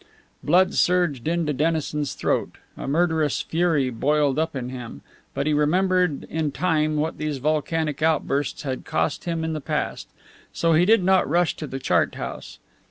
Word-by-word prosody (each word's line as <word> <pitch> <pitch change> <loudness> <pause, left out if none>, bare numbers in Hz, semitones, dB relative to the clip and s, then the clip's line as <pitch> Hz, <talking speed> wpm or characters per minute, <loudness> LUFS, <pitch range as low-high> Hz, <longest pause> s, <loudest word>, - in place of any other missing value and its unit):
Blood 185 +4 +3
surged 175 -8 +1
into 165 -2 0
Dennison's 150 0 -1
throat; - - -1 0.2
a - - -7
murderous 160 -1 +1
fury 160 -6 +1
boiled 145 +4 +1
up 160 -1 -1
in 125 -2 -4
him; 125 -2 -8 0.3
but - - -1
he 155 - +1
remembered 180 +2 +2
in 155 -2 -2
time 155 -2 0
what 155 +2 -2
these 155 -2 -2
volcanic 155 +1 -1
outbursts 150 -3 0
had 130 -3 -4
cost 80 0 -1
him 165 -2 -2
in 160 0 -2
the 155 - -4
past. - - -3 0.5
So 165 -1 +2
he 165 +3 +4
did 220 -1 +4
not 190 -4 +3
rush 175 +2 +2
to 155 - -5
the 135 - -5
chart 130 - +1
house. - - -7
155 Hz, 165 wpm, -23 LUFS, 145-170 Hz, 0.5 s, he